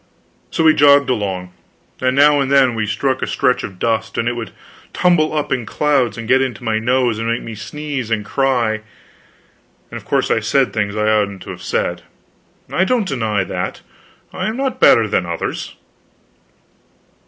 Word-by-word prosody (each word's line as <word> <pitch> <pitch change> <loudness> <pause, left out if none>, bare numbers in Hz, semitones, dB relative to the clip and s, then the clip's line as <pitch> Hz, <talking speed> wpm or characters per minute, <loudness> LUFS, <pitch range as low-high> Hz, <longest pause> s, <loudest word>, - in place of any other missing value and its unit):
So 165 - -1
we 160 -1 +6
jogged 140 -2 +5
along, 95 -5 -3 0.5
and 130 0 +1
now 145 +1 +5
and 135 0 -1
then 135 -3 +4
we 110 -2 -2
struck 130 +5 -1
a - - -1
stretch 125 - +1
of 95 - -7
dust, 110 +1 -1
and 115 - 0
it 120 - -1
would 115 -2 -5 0.4
tumble 175 -4 +2
up 150 -1 -2
in 125 - 0
clouds 135 -3 0
and 115 -1 -6
get 130 +2 +4
into 125 -5 -3
my 110 -2 0
nose 120 -1 +1
and 115 - -2
make 115 - -1
me 115 - -7
sneeze 130 +3 -5
and 110 -2 -1
cry; 120 -4 0 1.1
and - - -6
of - - -17
course - - 0
I - - +3
said - - +1
things 105 -1 -1
I 105 0 0
oughtn't 100 -3 0
to - - -8
have - - -9
said, - - -2 0.7
I 185 - +2
don't 220 0 +1
deny 110 - -1
that. - - -4 0.5
I 185 - -3
am 220 +2 -3
not 270 -1 -2
better - - +6
than - - 0
others. - - -4
120 Hz, 185 wpm, -18 LUFS, 110-140 Hz, 1.1 s, we